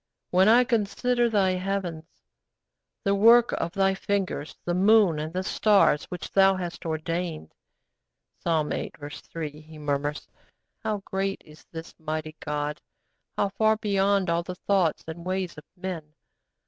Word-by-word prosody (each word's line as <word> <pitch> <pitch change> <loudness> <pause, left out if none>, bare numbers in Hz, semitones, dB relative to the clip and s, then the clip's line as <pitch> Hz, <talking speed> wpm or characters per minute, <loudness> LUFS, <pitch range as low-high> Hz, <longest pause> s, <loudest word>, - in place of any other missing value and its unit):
'When 185 +3 +5
I 240 +3 +7
consider 240 +1 +1
Thy 200 -4 +3
heavens, 185 -3 -3 1.0
the 200 - +2
work 230 +4 +6
of 170 - -2
Thy 195 0 +2
fingers, 190 -6 -2
the 175 - 0
moon 195 -3 +4
and 155 +1 -4
the 185 +2 -2
stars, 200 -6 +3
which 180 - -7
Thou 195 0 +5
hast 175 -1 -5
ordained' 165 - -3 0.9
(Psalm 160 -3 0
viii. - - -3 0.2
3) 155 -2 -7
he 155 0 -13
murmurs; 145 0 -2 0.5
'how 215 -3 -3
great 195 0 -2
is 155 0 -17
this 165 0 -8
mighty 155 -1 -4
God, 150 0 -3 0.6
how 200 - +2
far 220 +2 +2
beyond 200 -2 +1
all 170 0 +1
the 180 +1 -7
thoughts 185 -4 +1
and 165 +1 -7
ways 185 -1 -2
of 150 - -12
men! 175 -5 -6
185 Hz, 145 wpm, -26 LUFS, 160-200 Hz, 1.0 s, I